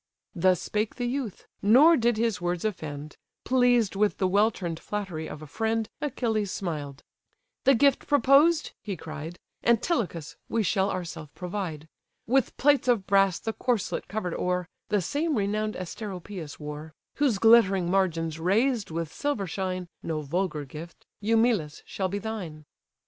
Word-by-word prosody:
Thus 185 +1 +3
spake 210 0 -2
the 245 - -2
youth; 245 -4 -3 0.2
nor 270 +11 +7
did 235 -4 +2
his 225 -4 0
words 175 +2 -1
offend; 155 -7 -5 0.3
Pleased 245 -5 +3
with 205 +1 +2
the 190 - +1
well 205 +4 +4
turn'd 170 -6 -5
flattery 190 -7 -4
of 150 - -8
a - - -7
friend, 220 +7 -1
Achilles 225 -7 -1
smiled: 145 -7 -4 0.6
"The 275 - +6
gift 275 +3 +3
proposed 290 +3 +4
(he 200 -4 -5
cried), 155 +2 -7 0.3
Antilochus! 225 - 0
we 230 - +1
shall 195 0 +1
ourself 165 -5 -5
provide. 180 -5 -5 0.4
With 260 +1 +1
plates 285 -2 +3
of 235 -6 +2
brass 195 -2 +3
the 225 - -4
corslet 240 -4 -1
cover'd 180 -3 -3
o'er, 180 -1 -1 0.2
(The 205 -3 +1
same 300 - 0
renown'd 215 +1 -1
Asteropaeus 185 -3 -7
wore,) 150 +1 -7 0.2
Whose 270 -7 +2
glittering 195 -5 +5
margins 165 -4 0
raised 220 +6 +1
with 165 0 -4
silver 285 -9 -1
shine, 185 0 -3
(No 155 -2 -3
vulgar 165 0 -2
gift,) 155 +5 -10 0.2
Eumelus! 220 -8 +1
shall 190 -1 -2
be 200 - -2
thine." 190 -8 -6
195 Hz, 150 wpm, -27 LUFS, 170-230 Hz, 0.6 s, nor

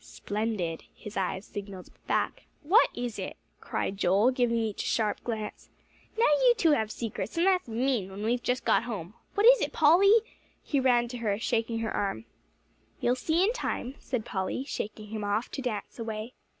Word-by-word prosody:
"Splendid!" 205 -6 -3
his 210 - -10
eyes 190 +1 -2
signalled 200 -2 -8 0.2
back. - - -1 0.2
"What 395 +11 +5
is 240 -2 -4
it?" - - -5 0.2
cried 195 - -3
Joel, 200 +6 +4
giving 245 -2 +1
each 220 -3 -1
a - - -3
sharp 215 -2 0
glance. 220 -3 -5 0.5
"Now 460 - +4
you 475 +12 +5
two 335 -7 +4
have 220 -7 +2
secrets; 220 - -5
and 340 - +3
that's 370 -5 +3
mean, 230 -3 0
when 195 +2 -7
we've 240 +2 +1
just 250 +2 -1
got - - +3
home. 205 -6 -5 0.2
What 410 - +3
is - - +8
it, - - -1
Polly?" 385 +8 +6 0.4
He 285 - 0
ran 245 -2 +3
to 245 - -5
her, 210 -3 0
shaking 230 0 -1
her 225 - -2
arm. 205 +2 -2 0.7
"You'll 245 - +2
see 320 +7 +1
in 430 +4 +2
time," 265 - -3
said 250 -5 -3
Polly, 190 +6 -2
shaking 215 -5 -5
him 215 -1 -4
off, 205 +3 -1
to 270 - -4
dance 230 -3 -4
away. 225 +1 -5
230 Hz, 185 wpm, -29 LUFS, 210-270 Hz, 0.7 s, is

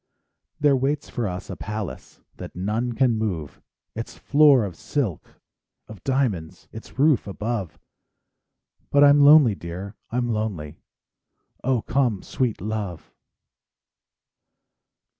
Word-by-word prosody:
There 145 -2 +4
waits 140 +2 -1
for 120 -4 -2
us 90 0 -5
a - - -6
palace 105 -1 -6 0.2
That - - -9
none 110 +7 -2
can 120 -2 +2
move; 90 -10 -4 0.3
Its 115 +1 -6
floor 140 -5 +5
of 95 -4 -7
silk—of 110 - -6
diamonds 120 - -1
Its 110 - -11
roof 145 -5 +3
above; 105 -3 -4 1.1
But 145 0 +5
I'm 145 0 +7
lonely, 145 -5 +7
dear, 90 +3 -7 0.2
I'm 120 +1 -1
lonely 105 -10 -3 0.4
— - - -45
Oh, 125 -3 +1
come, 120 -7 0
sweet 125 -8 -2
love! 105 -4 -5
110 Hz, 115 wpm, -24 LUFS, 100-135 Hz, 1.1 s, I'm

